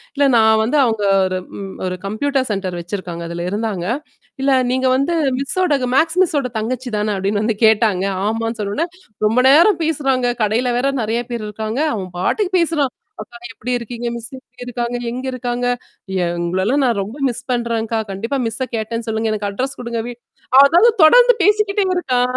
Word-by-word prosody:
இல்ல 285 - +2
நான் 220 -1 +5
வந்து 235 +7 0
அவுங்க 220 -4 0 0.2
ஒரு 185 0 -2 0.2
ம் 195 -1 -7
ஒரு 185 0 -2
கம்ப்யூட்டர் 260 +6 -1
சென்டர் 190 -3 -2
வச்சிருக்காங்க 175 -1 -5
அதில 170 0 -4
இருந்தாங்க 205 -3 -2 0.6
"இல்ல 275 +1 +2 0.2
நீங்க 260 +1 +1
வந்து, 295 +6 0 0.2
மிஸ்ஸோட 300 +3 +1 0.2
மேக்ஸ் 325 +5 +2
மிஸ்ஸோட 290 -7 0
தங்கச்சி 250 +4 -3
தானே?" 210 0 0
அப்பிடின்னு 200 +2 -1
வந்து 220 -1 0
கேட்டாங்க. 215 -4 +3 0.2
ஆமான்னு 225 +1 -2
சொன்னோன்னே, 205 +11 -1 0.4
ரொம்ப 225 +3 +2
நேரம் 335 +6 +5
பேசுறாங்க. 270 -5 0 0.2
கடையில 230 +4 +1
வேற 270 - +1
நெறையா 225 +2 -1
பேர் 235 -2 -4
இருக்காங்க. 220 +4 -4
அவன் 190 -4 -5
பாட்டுக்கு 380 - 0
பேசுறான். 310 -6 +1 0.3
அக்கா 225 +3 -13
நீங்க 255 - -9
எப்பிடி 250 +1 -4
இருக்கீங்க? 240 0 -6
மிஸ் 235 0 -7
எப்பிடி 250 -1 -13
இருக்காங்க? 240 0 -3
எங்க 250 +2 -5
இருக்காங்க? 245 -1 -2 0.6
எங்களல்லாம் 185 +10 0
நான் 235 -4 +1
ரொம்ப 210 +7 -7
மிஸ் 240 - -6
பண்றேன்க்கா! 230 -2 -1
கண்டிப்பா 230 +8 -3
மிஸ்ஸ 225 +4 -3
கேட்டேன்னு 230 +1 -4
சொல்லுங்க. 220 0 -1
எனக்கு 205 -1 -3
அட்ரெஸ் 260 +7 -4
குடுங்க. 235 -1 -3
வீ" 245 - -6 0.5
அதாவது 345 +11 +5
தொடர்ந்து - - +7
பேசிக்கிட்டே 415 -1 +2
இருக்கான் 250 -7 +1
235 Hz, 165 wpm, -19 LUFS, 215-270 Hz, 0.6 s, தொடர்ந்து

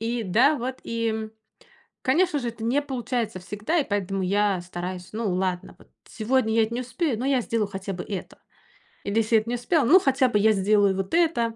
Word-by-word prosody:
и 230 +1 -2
да, 250 +11 +4
вот 255 +1 -4
и, 230 0 -1
м, 220 0 -3 0.7
конечно 310 +4 +2
же, 245 -3 -3
это 225 -1 -7
не 275 +5 +1
получается 245 -6 -3
всегда, 210 - -2
и 285 - -1
поэтому 195 -2 -1
я 200 0 +1
стараюсь 180 +1 -6
Ну, 215 -4 -2
ладно, 185 -1 -2
вот - - -20 0.2
сегодня 225 0 0
я 225 -1 +4
не 235 +2 -3
успею, 255 0 -2
но 255 - -2
я 270 -2 +2
сделаю 225 -3 -1
хотя 195 0 -5
бы 180 - -6
это. 195 -3 -7 0.7
Или 200 +2 -2
если 225 0 +3
эт 215 - -9
не 240 - -1
успела- 270 +3 +1
ну, 360 +9 +7
хотя 270 -5 +2
бы 210 - +2
я 220 +2 +5
сделаю 200 -1 +3
вот 190 0 -4
это. 280 -10 +2
225 Hz, 210 wpm, -25 LUFS, 200-255 Hz, 0.7 s, ну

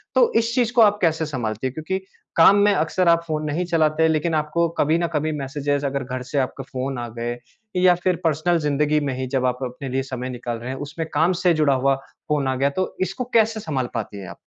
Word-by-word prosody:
तो 485 -1 +5
इस 230 0 -1
चीज़ 245 -3 +2
को 240 - +5
आप 205 -1 +5
कैसे 160 -2 +2
संभालते 120 -5 -3
हैं? 130 - -6
क्योंकि 160 +6 -3 0.4
काम 170 +4 +7
में 205 - +4
अक्सर 175 +2 +1
आप 170 0 +4
फ़ोन 155 -1 -2
नहीं 155 +4 -1
चलाते, 160 -2 +2
लेकिन 160 +1 0
आपको 155 +2 +1
कभी 155 +3 +3
न 170 - 0
कभी 155 +1 0
मैसेजेज़, 145 +1 -2
अगर 140 0 -1
घर 130 0 -5
से 145 - -2
आपके 135 +1 -2
फ़ोन 130 +1 -4
आ 120 - -4
गए 120 +1 -3 0.4
या 180 0 +5
फिर 185 -1 +2
पर्सनल 165 +2 +2
ज़िंदगी 150 0 +1
में 140 -2 -2
ही 130 - -3
जब 130 0 0
आप 125 0 0
अपने 130 +2 -5
लिए 135 +1 -1
समय 130 -1 -5
निकाल 120 -1 -4
रहे 120 +2 -7
हैं, 130 - -4
उसमें 150 +3 -5
काम 170 +3 +3
से 180 - +5
जुड़ा 150 -3 +3
हुआ 135 +1 +2 0.3
फ़ोन 145 -2 +1
आ 130 - 0
गया, 135 +2 +2
तो 185 +7 -3
इसको 190 +6 -1
कैसे 225 -1 +3
संभाल 135 - -2
पाती 100 - -4
हैं 95 - -8
आप? - - -10
150 Hz, 240 wpm, -22 LUFS, 130-170 Hz, 0.4 s, काम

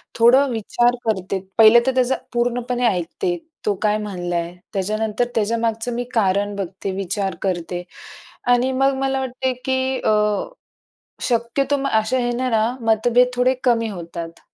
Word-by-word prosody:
थोडं 255 +4 +5
विचार 240 +2 +1
करते. 195 -3 -1 0.2
पहिलं 225 +1 +8
तर 260 - +1
त्याचा 255 +1 +2 0.2
पूर्णपणे 245 +1 0
ऐकते, 225 - -1 0.3
तो 210 - +2
काय 210 -1 +2
म्हणला 180 -5 -4
आहे, 170 +1 -3 0.2
त्याच्यानंतर 215 +4 -1
त्याच्यामागचं 225 +2 0
मी 245 +1 -2
कारण 205 -1 +1
बघते, 195 0 -4
विचार 195 -1 -2
करते 180 -1 -2 0.7
आणि 250 +2 +2
मग 270 +1 +2
मला 270 0 0
वाटतंय, 260 0 -2
की 260 0 0
अ, - - +2 1.1
शक्यतो 250 +4 0
म 275 - -1
अशा 220 +2 +1
ह्याने 245 +1 -1
ना 220 -2 +2 0.2
मतभेद 240 +3 +4
थोडे 250 +1 +3
कमी 230 -3 +2
होतात. 170 -3 -7
230 Hz, 140 wpm, -21 LUFS, 200-250 Hz, 1.1 s, पहिलं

